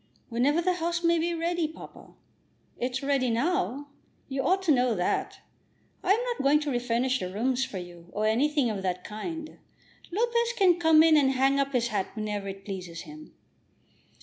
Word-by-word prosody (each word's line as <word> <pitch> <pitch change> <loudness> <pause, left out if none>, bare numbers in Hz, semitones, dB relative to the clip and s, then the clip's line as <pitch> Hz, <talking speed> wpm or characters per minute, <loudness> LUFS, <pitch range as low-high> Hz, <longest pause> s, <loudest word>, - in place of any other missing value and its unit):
"Whenever 265 +8 +2
the 365 +1 +2
house 340 +1 -2
may 335 0 +3
be 340 +2 0
ready, 340 0 -1
papa." 315 - -13 0.6
"It's 255 +2 -2
ready 275 -2 +1
now. 285 +2 -1 0.4
You 270 0 -2
ought 375 +8 +1
to 340 - +3
know 250 -4 +3
that. 180 -2 -2 0.6
I 385 - +4
am 460 +4 0
not 485 -1 -2
going 285 +2 +4
to 295 -1 -2
refurnish 245 +1 0
the 185 - -4
rooms 250 +6 0
for 195 - -7
you, 175 -1 -10
or 215 - -1
anything 260 +3 +2
of 200 -2 -4
that 180 -1 -2
kind. 315 +9 -7 0.5
Lopez 470 +4 +1
can 360 -3 +4
come 320 -2 +6
in 320 -1 +6
and 270 -2 +3
hang 270 +1 +2
up 275 0 0
his 240 -1 +1
hat 205 -4 -1
whenever 210 -2 -3
it 195 0 -8
pleases 180 -4 -6
him." 305 0 -12
270 Hz, 180 wpm, -27 LUFS, 225-330 Hz, 0.6 s, come